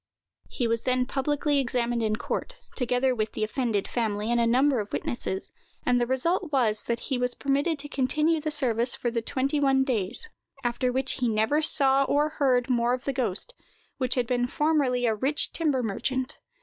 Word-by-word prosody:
He 240 - -1
was 230 0 0
then 255 0 +2
publicly 285 +2 0
examined 240 -2 0
in 215 -1 +1
court, - - -4 0.2
together 250 +1 +1
with 215 -2 -2
the - - -2
offended 215 -2 -1
family 215 -2 -1
and 240 0 +3
a 230 - +2
number 260 +2 +3
of 205 -1 -5
witnesses; 190 -5 -3 0.3
and 245 -1 +3
the 240 - +1
result 320 +6 0
was, 225 -6 +1
that 235 0 -2
he 265 -3 -2
was 250 0 -1
permitted 285 +4 0
to 290 +1 -5
continue 305 +4 +1
the 310 - -2
service 245 -5 +1
for 240 - -2
the 230 0 -1
twenty 275 +5 -1
one 270 -1 +3
days, 245 - -2 0.4
after 245 +1 0
which 265 +1 -1
he 250 - +1
never 220 +8 +2
saw 275 -3 +4
or 295 +2 +2
heard 260 -5 +1
more 240 -1 +2
of 255 - -10
the 275 - -1
ghost, 250 - -1 0.5
who 255 - +1
had 250 -2 +1
been 245 +1 0
formerly 275 -4 +1
a 225 - +3
rich 270 +8 0
timber 290 -6 0
merchant. 255 +5 -2
255 Hz, 190 wpm, -27 LUFS, 235-280 Hz, 0.5 s, saw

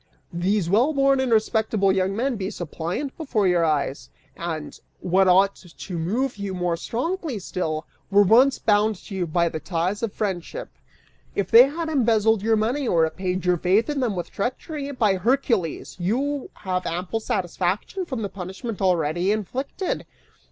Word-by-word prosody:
These 180 +2 0
well 235 - +3
born 275 -1 +3
and 260 -2 0
respectable 220 -2 +2
young 190 0 0
men 250 +3 0
be 195 -2 -3
suppliant 175 - -4
before 235 - 0
your 175 -2 +3
eyes 145 -3 -1 0.3
and, 160 -3 -5 0.2
what 190 +2 +3
ought 195 +2 +5
to 180 +1 -11
move 220 +10 -1
you 200 -2 -4
more 175 -1 0
strongly 310 - -3
still, 165 -4 -3 0.2
were 200 +1 +6
once 250 +7 +5
bound 215 0 +2
to 195 - -12
you 185 -3 -1
by 170 +2 +2
the 160 - -3
ties 175 +5 -2
of 230 -3 -1
friendship. 205 - -4 0.7
If 200 -2 -1
they 240 +2 +10
had 325 +3 -4
embezzled 225 -7 +2
your 225 +2 +2
money 245 +6 0
or 165 -5 +3
repaid 180 +2 -2
your 180 -1 +3
faith 195 - +2
in 290 - -2
them 240 -6 0
with 175 - -5
treachery, 280 - -3
by 220 -8 +1
Hercules, 225 - 0
you 265 +10 -1
have 185 -2 -3
ample 180 +6 -2
satisfaction 190 - -2
from 260 -9 -4
the - - -1
punishment 190 +4 -6
already 175 0 +1
inflicted! 255 - -3
200 Hz, 165 wpm, -24 LUFS, 180-245 Hz, 0.7 s, they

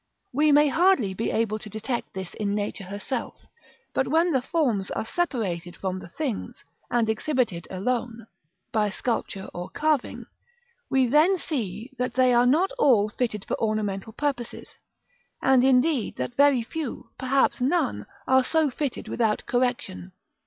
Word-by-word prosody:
We 300 +3 +4
may 295 +1 +6
hardly 305 - +3
be 220 +4 -2
able 220 -1 0
to 215 - -9
detect 220 +3 -4
this 190 -2 -6
in 205 -1 -2
Nature 205 -1 -3
herself; 205 +6 -5 0.5
but 265 - +1
when 330 +5 +3
the 265 -4 +2
forms 250 - 0
are - - -3
separated 205 - -2
from 185 -1 -3
the - - -10
things, 245 - -4 0.3
and 235 -2 +2
exhibited 220 - -1
alone 230 +3 -2 0.5
(by 210 -2 +2
sculpture 205 -3 -3
or 175 0 -6
carving), 305 -4 -1 0.6
we 265 -1 +3
then 305 +9 +4
see 230 - -4
that 250 -1 -1
they 255 -1 +4
are 240 +1 +5
not 330 +9 +3
all 220 - +4
fitted 210 -2 -2
for - - -3
ornamental 215 -1 -1
purposes; 260 -3 -3 0.7
and 260 -2 +4
indeed 265 0 +3
that - - -4
very 280 -2 +4
few, 295 +2 -6
perhaps 265 0 +2
none, 315 +8 0 0.2
are 260 0 +5
so 315 +1 +2
fitted 280 0 -3
without 220 -3 0
correction. 245 -7 -1
245 Hz, 150 wpm, -25 LUFS, 210-275 Hz, 0.7 s, may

